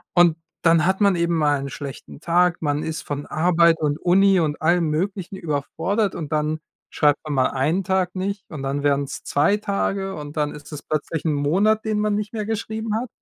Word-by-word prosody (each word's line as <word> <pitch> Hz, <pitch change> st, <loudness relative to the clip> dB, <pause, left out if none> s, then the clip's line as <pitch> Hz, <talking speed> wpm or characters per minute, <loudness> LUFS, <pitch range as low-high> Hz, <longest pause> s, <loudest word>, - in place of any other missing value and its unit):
Und 175 Hz, -2 st, +5 dB, 0.3 s
dann 165 Hz, 0 st, +4 dB
hat 190 Hz, +2 st, +1 dB
man 200 Hz, -2 st, +4 dB
eben 170 Hz, 0 st, +1 dB
mal 145 Hz, -3 st, +2 dB
'n 140 Hz, -, -5 dB
schlechten 140 Hz, 0 st, -8 dB
Tag, 175 Hz, +1 st, +2 dB
man 145 Hz, 0 st, 0 dB
ist 160 Hz, -1 st, -4 dB
von 145 Hz, 0 st, -5 dB
Arbeit 170 Hz, 0 st, +3 dB
und 150 Hz, 0 st, -1 dB
Uni 190 Hz, +1 st, +4 dB
und 150 Hz, -2 st, -1 dB
allem 170 Hz, 0 st, +2 dB
Möglichen 190 Hz, +4 st, -2 dB
überfordert 175 Hz, +6 st, -1 dB
und 155 Hz, -3 st, -6 dB
dann 155 Hz, 0 st, 0 dB, 0.3 s
schreibt 145 Hz, -2 st, +2 dB
man 155 Hz, -2 st, -4 dB
mal 130 Hz, -1 st, +3 dB
1 155 Hz, +8 st, 0 dB
Tag 190 Hz, -1 st, 0 dB
nicht 195 Hz, +1 st, -3 dB
und 150 Hz, -4 st, -7 dB
dann 140 Hz, +1 st, -2 dB
werden's 140 Hz, -1 st, -1 dB
2 150 Hz, +8 st, +2 dB
Tage 195 Hz, -1 st, -2 dB
und 150 Hz, 0 st, -8 dB
dann 150 Hz, -1 st, 0 dB
ist 150 Hz, +1 st, -12 dB
es 150 Hz, -2 st, -6 dB
plötzlich 155 Hz, +1 st, -3 dB
1 155 Hz, -, +2 dB
Monat, 195 Hz, +10 st, +2 dB
den 215 Hz, -1 st, 0 dB
man 210 Hz, -1 st, +1 dB
nicht 210 Hz, +1 st, -3 dB
mehr 215 Hz, -2 st, -3 dB
geschrieben 220 Hz, 0 st, -3 dB
hat. 245 Hz, +3 st, -2 dB
165 Hz, 205 wpm, -22 LUFS, 150-195 Hz, 0.3 s, Und